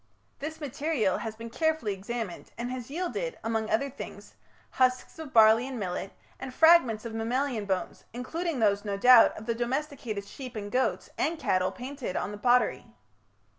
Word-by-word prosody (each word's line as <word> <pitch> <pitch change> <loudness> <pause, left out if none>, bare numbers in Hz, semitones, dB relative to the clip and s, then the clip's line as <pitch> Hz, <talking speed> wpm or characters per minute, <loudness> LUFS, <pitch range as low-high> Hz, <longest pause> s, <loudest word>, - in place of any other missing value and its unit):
This 310 +3 -5
material 280 - -1
has 220 -1 -5
been 230 +1 -8
carefully 315 -8 0
examined, 200 0 -5
and 240 +2 -3
has 255 -1 -6
yielded, 365 - -3
among 225 -1 -1
other 255 +6 +1
things, 275 0 -9 0.4
husks 255 +4 +1
of 310 -4 -7
barley 225 +2 +6
and 260 -3 -5
millet, 190 0 -3 0.3
and 265 - -6
fragments 260 -8 +5
of 230 - -5
mammalian 235 0 -1
bones, 190 -3 -3
including 320 +7 -3
those, 205 -2 +2
no 200 -2 -2
doubt, 245 +2 +7
of 215 - -8
the 230 - 0
domesticated 240 -3 -3
sheep 255 +3 -9
and 205 -1 -5
goats 255 +1 0
and 330 +1 0
cattle 185 -9 +1
painted 260 -4 -6
on 200 - -2
the 210 - -8
pottery. 245 0 +2
240 Hz, 170 wpm, -28 LUFS, 215-275 Hz, 0.4 s, doubt